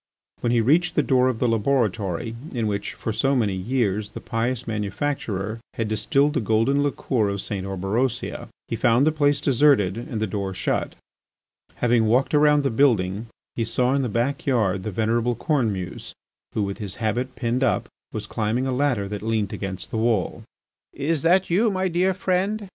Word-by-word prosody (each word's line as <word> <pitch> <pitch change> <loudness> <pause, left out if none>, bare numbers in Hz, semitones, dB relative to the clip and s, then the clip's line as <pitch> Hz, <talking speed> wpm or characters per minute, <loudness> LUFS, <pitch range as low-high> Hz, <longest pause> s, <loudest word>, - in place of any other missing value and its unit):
When 120 - 0
he 120 -1 +3
reached 165 +9 +2
the 150 - +3
door 130 -1 +3
of 130 -3 0
the 125 - +1
laboratory 115 -3 0 0.2
in 115 -2 0
which, 100 -1 -2
for 110 - -3
so 135 +5 +1
many 110 -6 +1
years, 105 0 -1
the - - -8
pious 120 +2 -2
manufacturer 105 -1 -3 0.2
had 115 - -1
distilled 140 +7 +2
the 150 - +1
golden 115 +6 +2
liqueur 130 -6 0
of 100 0 -3
St. 95 -1 -4
Orberosia, 105 +6 -2 0.2
he - - -2
found 120 +5 +3
the 155 - +4
place 145 -2 +2
deserted 130 -8 +3
and 115 -2 -5
the 110 - +1
door 100 -2 -3
shut. - - -1 0.8
Having 120 -2 +2
walked 125 +7 +2
around 150 -1 +5
the 135 - +1
building 110 -5 +2 0.3
he 115 - 0
saw 125 +3 +1
in 140 - +2
the 125 - -1
backyard 115 -5 0
the 110 - -4
venerable 115 +4 0
Cornemuse, 110 - -2 0.4
who, 105 - +1
with 100 0 -4
his 100 -4 -4
habit 120 +4 -2
pinned 125 +2 -1
up, 130 - +1 0.2
was - - -4
climbing 115 +4 -1
a 130 - -1
ladder 125 -6 +1
that 105 0 -5
leant 110 -2 -1
against 95 -2 -5
the - - -2
wall. 110 -4 0 0.5
"Is 150 +1 -1
that 180 +2 +3
you, 215 +6 +3
my 190 -1 0
dear 185 +2 +1
friend?" 195 +3 -1
115 Hz, 180 wpm, -24 LUFS, 105-140 Hz, 0.8 s, around